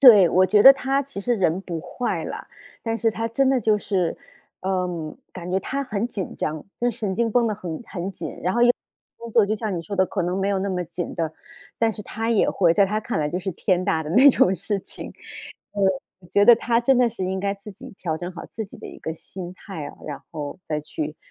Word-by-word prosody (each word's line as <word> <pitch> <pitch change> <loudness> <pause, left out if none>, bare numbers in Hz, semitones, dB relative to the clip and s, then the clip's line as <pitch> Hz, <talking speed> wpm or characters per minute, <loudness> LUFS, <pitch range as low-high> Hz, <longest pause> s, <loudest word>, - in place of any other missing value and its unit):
对， 210 -9 +9
我 185 +2 +4
觉 210 +1 +5
得 270 - +12
他 275 +1 0
其 275 -7 -7
实 240 +4 +1
人 185 -4 +1
不 170 -4 -4
坏 185 +8 -3
啦。 - - -6 0.4
但 225 -1 -1
是 230 0 +2
他 225 +1 -2
真 260 +4 +2
的 265 -2 +3
就 215 -1 +3
是， 190 -5 -1 0.4
嗯， 180 -4 -2 0.2
感 180 -1 -7
觉 185 - +2
他 275 +8 -3
很 225 -4 -2
紧 200 -6 -5
张 155 0 -3 0.2
就 240 - +3
是 230 - -10
神 210 -5 -2
经 230 0 +1
绷 240 0 +4
得 215 - -1
很 175 -4 -6
很 190 0 -4
紧， - - -7
然 180 +2 0
后 240 - +3
又 240 - +7 0.5
工 235 0 -9
作 225 -1 +5
就 210 +2 0
像 210 -4 -2
你 170 - -3
说 200 +5 -5
的， 190 -1 +4
可 195 - -2
能 180 +2 -1
没 195 +1 +1
有 200 -1 +1
那 200 - -1
么 180 -1 -1
紧 175 +1 -5
的 160 -2 -1 0.5
但 225 -1 +2
是 210 - -8
他 225 +3 -3
也 225 - +3
会 175 -4 +3
在 200 +3 +4
他 210 +2 -1
看 220 -4 -2
来 150 - +1
就 175 - -2
是 190 - -2
天 185 +1 +1
大 160 -2 +1
的 150 - -6
那 260 - +8
种 190 -6 +4
事 200 +3 -1
情。 - - -9 1.1
我 175 - -17
觉 205 +2 +5
得 240 - +10
他 235 -1 +1
真 260 +2 +4
的 250 -1 +5
是 220 -5 -4
应 190 +1 -1
该 200 0 0
自 200 +1 -11
己 - - -11
调 160 -3 -2
整 175 +2 -5
好 170 - -8
自 220 - -5
己 200 - -13
的 - - -8
一 - - -10
个 160 - -3
心 180 +2 -8
态 185 -6 -7
啊， - - -10
然 145 -2 -5
后 150 +1 -5
再 150 -1 -1
去 150 0 -5
195 Hz, 270 characters per minute, -24 LUFS, 175-225 Hz, 1.1 s, 得